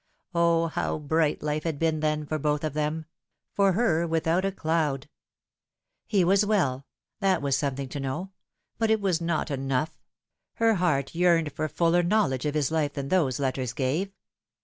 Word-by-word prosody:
O, 170 -1 +3
how 165 - -2
bright 155 0 0
life 150 0 -1
had 160 -3 -2
been 160 0 +1
then 150 0 0
for 155 +1 -2
both 150 +1 0
of 155 -3 -2
them! 155 +1 -2 0.5
for 195 -1 +3
her 170 -6 +2
without 165 +2 +1
a 195 - 0
cloud. 155 -6 -1 1.0
He 200 -4 +3
was 195 +4 +4
well 140 -11 0 0.3
that 195 -3 +2
was 140 -1 +2
something 140 -2 -2
to 145 - -5
know; 150 +8 -4 0.5
but 225 -1 +2
it 220 0 +3
was 185 -4 0
not 165 -2 -1
enough. 135 +2 -2 0.5
Her 225 0 +3
heart 155 -8 0
yearned 170 -3 +3
for 155 - -2
fuller 165 +3 +2
knowledge 170 - +1
of 150 - -2
his 150 -1 +1
life 150 -3 0
than 140 -1 -4
those 150 -10 +2
letters 130 -2 -1
gave. 145 +10 -1
160 Hz, 170 wpm, -27 LUFS, 145-175 Hz, 1.0 s, was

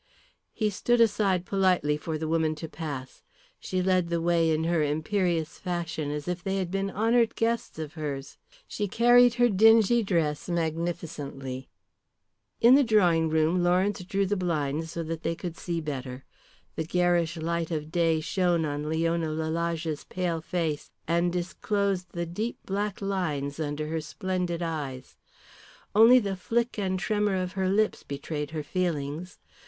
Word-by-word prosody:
He 215 -2 -1
stood 240 +5 +1
aside 200 -5 +3
politely 185 -6 +2
for 155 +1 -4
the 160 +1 -3
woman 160 -1 +1
to 160 +1 -6
pass. 145 -5 -7 0.4
She 185 -1 -2
led 185 -2 +2
the 170 0 0
way 165 -1 +2
in 160 0 +1
her 165 -1 +1
imperious 160 +2 0
fashion 170 -4 -3
as 150 +1 -4
if 180 0 -3
they 195 0 -1
had 185 -2 -2
been 195 0 -1
honoured 230 +3 +2
guests 230 -4 -1
of 155 -1 -5
hers. 140 -4 -5 0.3
She 205 - -2
carried 240 +3 +5
her 245 0 +4
dingy 225 +2 +5
dress 165 -6 -1
magnificently. 160 -6 -3 0.9
In 235 +2 +7
the 280 +1 +7
drawing 175 -8 +3
room, 160 +3 +2
Lawrence 185 +2 +2
drew 195 +2 0
the 205 +2 0
blinds 160 -4 -1
so 165 +1 -4
that 165 0 -4
they 165 0 -1
could 170 -1 -6
see 170 -1 -3
better. 135 -4 -5 0.5
The 160 - -1
garish 175 0 +1
light 165 0 -2
of 155 -2 -4
day 165 -2 +2
shone 175 -1 +1
on 145 0 -3
Leon 165 +1 +1
Lalage's 160 0 -2
pale 175 -3 -2
face, 160 -3 -2 0.2
and 170 +1 +2
disclosed 185 +1 -1
the 170 0 -2
deep 210 +8 -3
black 200 0 -2
lines 155 -8 -2
under 150 0 -2
her 160 0 -2
splendid 175 +2 -3
eyes. 145 -6 -5 0.8
Only 225 +4 +8
the 200 -5 0
flick 230 +5 -1
and 190 -2 0
tremor 210 +1 0
of 185 -1 -2
her 190 -1 -1
lips 210 +2 +1
betrayed 145 +1 -5
her 155 -1 -4
feelings. 165 0 -3
170 Hz, 160 wpm, -27 LUFS, 155-190 Hz, 0.9 s, Only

